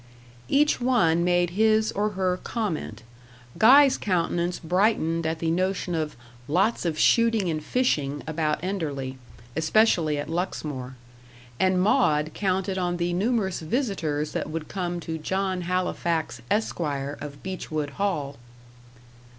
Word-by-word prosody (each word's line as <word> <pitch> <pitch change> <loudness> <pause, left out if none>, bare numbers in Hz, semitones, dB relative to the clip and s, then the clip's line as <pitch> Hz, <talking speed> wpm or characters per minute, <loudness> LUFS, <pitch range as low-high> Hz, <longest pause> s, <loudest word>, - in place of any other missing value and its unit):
Each 295 -1 +3
one 170 -10 +3
made 175 0 +2
his 220 +2 +3
or 210 +1 -1
her 185 -1 0
comment. 160 - -3 0.6
Guy's 270 +4 +7
countenance 175 -2 0
brightened 165 -2 +1
at 160 0 -1
the 160 0 -1
notion 185 +1 -1
of 155 -2 -2 0.3
"lots 185 +7 +1
of 160 -3 -1
shooting 225 -2 +3
and 155 -1 -3
fishing" 145 - 0
about 155 -1 -1
Enderley, 145 -9 -3 0.4
especially 160 -2 +3
at 145 - -4
Luxmore; 150 -6 -4 0.6
and 185 -1 +3
Maud 160 - +2
counted 190 -1 -1
on 175 -1 -1
the 175 0 -1
numerous 200 -1 0
visitors 160 - -2
that - - -3
would 155 -1 -5
come 175 -2 -3
to 160 0 -5
John 190 +3 -1
Halifax, 170 -6 -1
Esquire, 145 -9 -1
of 140 -1 -8
Beechwood 155 -6 -4
Hall. 150 -9 -1
175 Hz, 125 wpm, -25 LUFS, 155-195 Hz, 0.6 s, Guy's